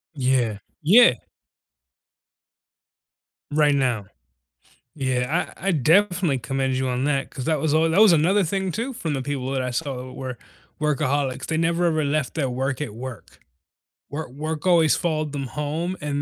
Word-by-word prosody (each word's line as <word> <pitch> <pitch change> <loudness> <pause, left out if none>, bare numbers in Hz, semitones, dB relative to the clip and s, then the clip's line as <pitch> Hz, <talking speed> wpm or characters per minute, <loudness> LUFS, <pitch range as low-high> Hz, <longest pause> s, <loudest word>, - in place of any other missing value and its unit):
Yeah, 125 -6 +1 0.2
yeah. 210 - +7 2.4
Right 150 -1 +3
now. 120 -7 0 0.9
Yeah. 130 +3 -1
I 195 - -5
I - - +4
definitely 170 0 +2
commend 135 +2 -1
you 130 0 -1
on 125 +1 -1
that 140 -2 0
'cause 130 -3 -7
that 155 -3 +1
was 150 0 0
all 160 +1 +3
that 175 +5 +2
was 215 -4 +8
another 185 +6 +3
thing 190 +2 -1
too 245 +8 -3
from 165 -11 -3
the 135 - -2
people 135 -1 -3
that 135 -1 0
I 125 -1 -2
saw 130 -3 -4
were 130 -2 -6 0.4
workaholics. 140 -2 0
They 160 - -1
never 170 +1 +1
ever 155 -2 +1
left 145 -2 -1
their 140 -5 0
work 130 +2 -2
at 110 -8 -4
work. 120 -5 -9 0.7
Work 145 -3 -5
work 155 +3 -5
always 165 -3 +5
followed 155 -3 -1
them 135 -2 -3
home, 155 +7 -3
and 145 -1 -2
145 Hz, 165 wpm, -23 LUFS, 130-165 Hz, 2.4 s, was